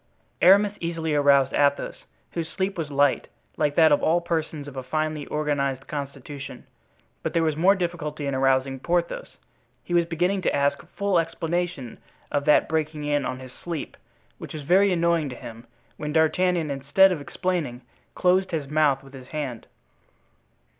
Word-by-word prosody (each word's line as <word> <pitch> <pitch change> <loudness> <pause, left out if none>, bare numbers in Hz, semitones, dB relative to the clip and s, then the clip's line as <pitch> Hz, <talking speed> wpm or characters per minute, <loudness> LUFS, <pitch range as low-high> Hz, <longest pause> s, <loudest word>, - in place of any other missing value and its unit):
Aramis 200 +3 +6
easily 165 -2 -2
aroused 140 -2 +4
Athos, 140 -1 +1 0.3
whose 165 -1 -4
sleep 190 +3 -2
was 160 -4 -4
light, 140 -1 +2 0.3
like 150 -2 0
that 160 -2 +6
of 145 - +4
all 170 +2 +3
persons 160 -3 -3
of 140 - -9
a 130 - -3
finely 155 +2 -2
organized 140 -3 -1
constitution. 140 0 -7 0.6
But - - -3
there 165 - +3
was 155 -2 +1
more 185 +6 +4
difficulty 165 -5 -3
in 140 - -1
arousing 135 0 +1
Porthos. 170 +4 -2 0.5
He 175 - -5
was 170 -1 +3
beginning 180 +4 0
to - - 0
ask 140 0 +1 0.2
full 200 -3 +2
explanation 165 -5 -3 0.3
of 145 -1 0
that 150 - +5
breaking 155 -1 -2
in 145 -2 0
on 130 - -3
his 130 -1 -10
sleep, 170 -3 -6 0.4
which - - -8
was 150 - -6
very 190 +6 +4
annoying 170 -3 +1
to 125 - -7
him, 115 0 -10 0.3
when 150 0 -4
D'Artagnan, 165 0 +2
instead 145 +8 +4
of 165 -5 -2
explaining, 150 -6 -3 0.3
closed 185 +1 +2
his 155 -5 -3
mouth 145 -2 +2
with 135 0 -15
his 130 -2 -11
hand. 140 -7 -5
155 Hz, 165 wpm, -25 LUFS, 140-170 Hz, 0.6 s, Aramis